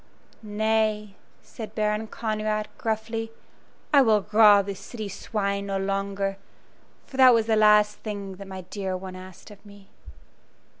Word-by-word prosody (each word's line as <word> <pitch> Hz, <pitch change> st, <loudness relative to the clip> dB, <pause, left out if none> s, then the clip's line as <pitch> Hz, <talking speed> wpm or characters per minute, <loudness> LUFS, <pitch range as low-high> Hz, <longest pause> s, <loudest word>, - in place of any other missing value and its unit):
"Nay," 215 Hz, -1 st, 0 dB, 0.3 s
said 220 Hz, -2 st, -9 dB
Baron 215 Hz, 0 st, -1 dB
Conrad, 215 Hz, -1 st, -2 dB
gruffly, 225 Hz, 0 st, -3 dB, 0.6 s
"I 285 Hz, -, +8 dB
will 215 Hz, -5 st, +3 dB
rob 210 Hz, -2 st, +6 dB
the 200 Hz, -, -4 dB
city 210 Hz, +3 st, -8 dB
swine 200 Hz, 0 st, -3 dB
no 195 Hz, -1 st, -1 dB
longer, 195 Hz, 0 st, -2 dB, 0.7 s
for 265 Hz, -, -11 dB
that 255 Hz, -2 st, +7 dB
was 225 Hz, -1 st, +2 dB
the 220 Hz, -1 st, +2 dB
last 210 Hz, -1 st, +4 dB
thing 200 Hz, -3 st, -6 dB
that 200 Hz, 0 st, -10 dB
my 190 Hz, -1 st, -7 dB
dear 190 Hz, 0 st, -4 dB
one 185 Hz, 0 st, -8 dB
asked 185 Hz, +2 st, -12 dB
of 205 Hz, -1 st, -15 dB
me." 200 Hz, -1 st, -16 dB
210 Hz, 145 wpm, -25 LUFS, 195-220 Hz, 0.7 s, I